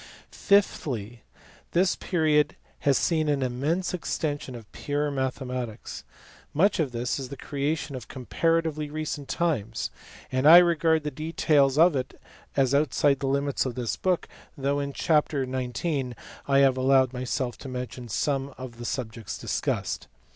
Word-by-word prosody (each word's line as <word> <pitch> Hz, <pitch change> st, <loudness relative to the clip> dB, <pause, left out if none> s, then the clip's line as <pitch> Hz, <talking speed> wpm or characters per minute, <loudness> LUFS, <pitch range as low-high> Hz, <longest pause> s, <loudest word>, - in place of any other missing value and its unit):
Fifthly, 120 Hz, -, +1 dB, 0.5 s
this 180 Hz, +2 st, +3 dB
period 155 Hz, -4 st, +2 dB, 0.2 s
has 140 Hz, -3 st, +3 dB
seen 155 Hz, -3 st, +1 dB
an 140 Hz, -2 st, +1 dB
immense 145 Hz, +10 st, -1 dB
extension 145 Hz, -6 st, -3 dB
of 115 Hz, -3 st, -11 dB
pure 145 Hz, 0 st, -2 dB
mathematics. 125 Hz, -4 st, -4 dB, 0.5 s
Much 190 Hz, +6 st, +3 dB
of 145 Hz, -5 st, +1 dB
this 120 Hz, +3 st, -2 dB
is 130 Hz, -2 st, -5 dB
the 140 Hz, -, -7 dB
creation 145 Hz, 0 st, -2 dB
of 125 Hz, -, -7 dB
comparatively 155 Hz, +3 st, 0 dB
recent 150 Hz, -2 st, -4 dB
times, 115 Hz, -11 st, -1 dB, 0.4 s
and 130 Hz, +2 st, +2 dB
I 165 Hz, +2 st, +11 dB
regard 165 Hz, -2 st, +4 dB
the 150 Hz, -, -3 dB
details 150 Hz, -2 st, +2 dB
of 165 Hz, 0 st, +6 dB
it 130 Hz, -1 st, -4 dB, 0.4 s
as 135 Hz, -1 st, +3 dB
outside 140 Hz, -1 st, +3 dB
the 135 Hz, -, -2 dB
limits 140 Hz, +1 st, +1 dB
of 130 Hz, -2 st, -4 dB
this 120 Hz, -3 st, -2 dB
book 185 Hz, -2 st, 0 dB, 0.3 s
though 140 Hz, +1 st, 0 dB
in 140 Hz, 0 st, -2 dB
chapter 150 Hz, -2 st, +1 dB
xix. 130 Hz, +1 st, -2 dB, 0.3 s
I 140 Hz, -1 st, +4 dB
have 135 Hz, -1 st, +4 dB
allowed 130 Hz, 0 st, +4 dB
myself 125 Hz, 0 st, -3 dB
to 135 Hz, -, -8 dB
mention 125 Hz, -1 st, -6 dB
some 135 Hz, +4 st, -1 dB
of 125 Hz, -2 st, -9 dB
the 120 Hz, -, -6 dB
subjects 115 Hz, -3 st, -4 dB
discussed. -, -, -2 dB
140 Hz, 145 wpm, -26 LUFS, 130-155 Hz, 0.5 s, I